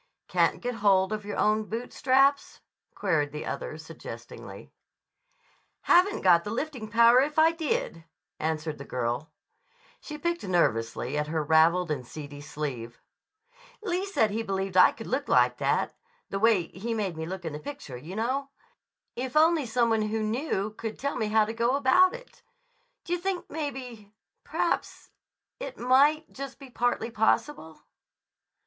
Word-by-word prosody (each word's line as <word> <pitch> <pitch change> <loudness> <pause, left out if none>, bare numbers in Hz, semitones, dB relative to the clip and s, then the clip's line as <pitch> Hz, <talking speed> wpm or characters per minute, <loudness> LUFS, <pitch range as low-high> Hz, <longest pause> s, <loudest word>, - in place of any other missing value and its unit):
"Can't - - +1
get 245 0 -2
hold 200 -2 +3
of 210 -1 -4
your 205 - -5
own 215 0 +2
boot 230 +3 -5
straps?" 275 +2 +2 0.3
queried 160 -7 0
the 150 +1 -6
other - - -5
suggestingly. - - -10 1.1
"Haven't 375 +4 +4
got 170 -2 +5
the - - -5
lifting 245 -1 -4
power 235 +3 +6
if 295 +2 -2
I 320 +1 +6
did," 305 - -2 0.4
answered 155 -1 -2
the - - -6
girl. 125 +4 -3 0.7
She 300 - -8
picked 340 +2 -2
nervously 145 - 0
at 150 - -2
her 155 0 -1
raveled 160 +3 +4
and 135 -4 -2
seedy 145 0 -9
sleeve. 130 -6 -6 0.8
"Lee 365 -2 -1
said 220 - +2
he 220 +2 -1
believed 195 -3 -3
I 185 - +7
could 225 - -10
look 275 +3 -2
like - - +4
that—the 485 - -3
way 210 -6 +3
he 225 +5 -4
made 200 -6 -2
me 160 0 -5
look 185 0 -6
in 160 - -4
the 150 - -5
picture, 280 - -8
you 155 +10 -8
know—if 260 +1 -5
only 315 -3 +4
some 230 0 +2
one 220 -1 +2
who 215 +1 -1
knew 215 -2 -1
could 220 0 -6
tell 280 +1 -2
me 220 -3 -1
how 215 0 +3
to 220 - -5
go 235 +3 +1
about 285 - +4
it. - - -14 0.6
D' 345 - -9
you 355 - +2
think 375 0 -3
maybe—p'raps—it 265 - -6
might 285 +5 +4
be - - -25
just 275 0 -7
partly 240 -1 0
possible?" 220 - 0
220 Hz, 155 wpm, -27 LUFS, 170-275 Hz, 1.1 s, I